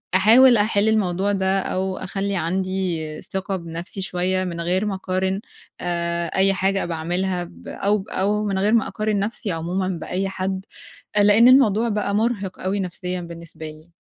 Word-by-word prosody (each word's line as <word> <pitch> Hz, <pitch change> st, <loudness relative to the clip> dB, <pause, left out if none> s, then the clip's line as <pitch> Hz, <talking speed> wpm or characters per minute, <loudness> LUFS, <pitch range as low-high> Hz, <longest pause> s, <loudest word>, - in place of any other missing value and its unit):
أحاول 235 Hz, +5 st, +7 dB
أحِل 210 Hz, 0 st, +2 dB
الموضوع 200 Hz, -2 st, +1 dB
ده، 190 Hz, -1 st, +1 dB
أو 190 Hz, 0 st, -2 dB
أخلّي 195 Hz, +1 st, -3 dB
عندي 175 Hz, -3 st, -2 dB
ثقة 195 Hz, 0 st, -4 dB
بنفْسي 170 Hz, +3 st, -7 dB
شوية 185 Hz, 0 st, 0 dB
من 170 Hz, -2 st, -4 dB
غير 180 Hz, +4 st, 0 dB
ما 205 Hz, -2 st, -1 dB
اقارن، 190 Hz, +1 st, -1 dB, 0.4 s
آآ 170 Hz, -1 st, -1 dB
أي 195 Hz, +1 st, +4 dB
حاجة 195 Hz, +1 st, 0 dB
باعملها 175 Hz, +2 st, -2 dB
ب -, -, -15 dB
أو 200 Hz, 0 st, 0 dB
أو 210 Hz, +2 st, 0 dB
من 195 Hz, -2 st, -1 dB
غير 205 Hz, +3 st, +2 dB
ما 230 Hz, -, +3 dB
أقارن 215 Hz, -2 st, -1 dB
نفْسي 205 Hz, 0 st, -3 dB
عمومًا 175 Hz, +3 st, -2 dB
بأي 185 Hz, +2 st, -2 dB
حد، 190 Hz, 0 st, -3 dB, 0.5 s
آآ 205 Hz, -, +6 dB
لإن 210 Hz, +4 st, +6 dB
الموضوع 235 Hz, -4 st, +5 dB
بقى 205 Hz, -1 st, -1 dB
مُرهِق 210 Hz, -3 st, -1 dB
أوي 190 Hz, +2 st, -1 dB
نفسيًا 180 Hz, 0 st, -4 dB
بالنسبة 170 Hz, -1 st, -9 dB
لي؟ 155 Hz, +2 st, -13 dB
190 Hz, 160 wpm, -22 LUFS, 175-205 Hz, 0.5 s, أحاول